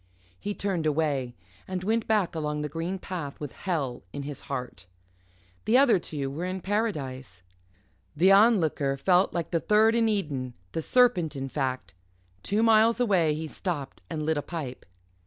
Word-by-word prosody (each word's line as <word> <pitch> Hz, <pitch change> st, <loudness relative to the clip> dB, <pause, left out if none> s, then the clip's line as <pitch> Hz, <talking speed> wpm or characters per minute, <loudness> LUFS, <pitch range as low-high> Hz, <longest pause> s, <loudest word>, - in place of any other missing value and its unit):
He 205 Hz, 0 st, -4 dB
turned 185 Hz, -6 st, -1 dB
away, 145 Hz, -5 st, 0 dB, 0.3 s
and 185 Hz, -1 st, -4 dB
went 225 Hz, +3 st, 0 dB
back 210 Hz, -5 st, +1 dB
along 150 Hz, -2 st, -2 dB
the 150 Hz, -, -3 dB
green 165 Hz, +5 st, -3 dB
path 175 Hz, -7 st, -6 dB
with 145 Hz, -2 st, -5 dB
hell 145 Hz, -10 st, -3 dB
in 140 Hz, -, -5 dB
his 145 Hz, -1 st, -6 dB
heart. 125 Hz, -10 st, -5 dB, 0.8 s
The 230 Hz, +3 st, +4 dB
other 260 Hz, -8 st, +5 dB
two 140 Hz, -5 st, -4 dB
were 155 Hz, +5 st, -5 dB
in 185 Hz, +1 st, -3 dB
Paradise. 135 Hz, -, -3 dB, 0.7 s
The 185 Hz, +5 st, +5 dB
Onlooker 180 Hz, -10 st, +4 dB
fell 180 Hz, +6 st, +3 dB
like 170 Hz, -2 st, -3 dB
the 170 Hz, -, +2 dB
third 215 Hz, +5 st, +4 dB
in 230 Hz, -1 st, +3 dB
Eden 140 Hz, -, -2 dB, 0.2 s
the 160 Hz, -, -2 dB
serpent, 185 Hz, -8 st, +3 dB
in 135 Hz, 0 st, -4 dB
fact. 130 Hz, -5 st, -3 dB, 0.5 s
Two 210 Hz, -, 0 dB
miles 225 Hz, +1 st, +5 dB
away 180 Hz, -10 st, +3 dB
he 160 Hz, +1 st, -4 dB
stopped 155 Hz, -5 st, -5 dB
and 155 Hz, -2 st, -3 dB
lit 160 Hz, 0 st, +1 dB
a -, -, 0 dB
pipe. 145 Hz, -6 st, -6 dB
165 Hz, 165 wpm, -27 LUFS, 140-200 Hz, 0.8 s, other